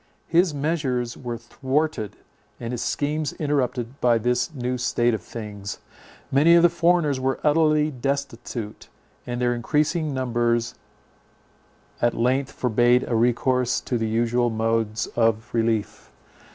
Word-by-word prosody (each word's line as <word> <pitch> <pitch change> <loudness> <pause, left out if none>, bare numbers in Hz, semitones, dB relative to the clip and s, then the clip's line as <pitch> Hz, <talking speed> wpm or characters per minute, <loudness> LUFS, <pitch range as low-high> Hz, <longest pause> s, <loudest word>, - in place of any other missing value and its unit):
His 170 +1 +3
measures 140 -5 -1
were 120 -2 -5
thwarted, 130 0 -2 0.4
and 115 0 -5
his 120 - -3
schemes 150 +1 -1
interrupted 135 -4 -2
by 120 -2 +4
this 125 +4 0
new 125 -3 -3
state 120 -1 +1
of 110 - -2
things. 105 -3 -7 0.5
Many 155 +5 +6
of 170 - +5
the 175 - +7
foreigners 170 -5 +2
were 130 0 -1
utterly 155 0 +3
destitute; 125 -5 -4 0.4
and 120 0 -3
their 120 0 +2
increasing 150 +6 0
numbers 120 -2 0 1.3
at 120 0 +2
length 130 +3 +1
forbade 120 +1 +2
a 115 - 0
recourse 125 +2 +2
to 120 - -2
the 110 -1 -1
usual 120 +2 +1
modes 110 -1 0
of 115 -1 0
relief. 115 -2 -1
125 Hz, 130 wpm, -24 LUFS, 115-145 Hz, 1.3 s, the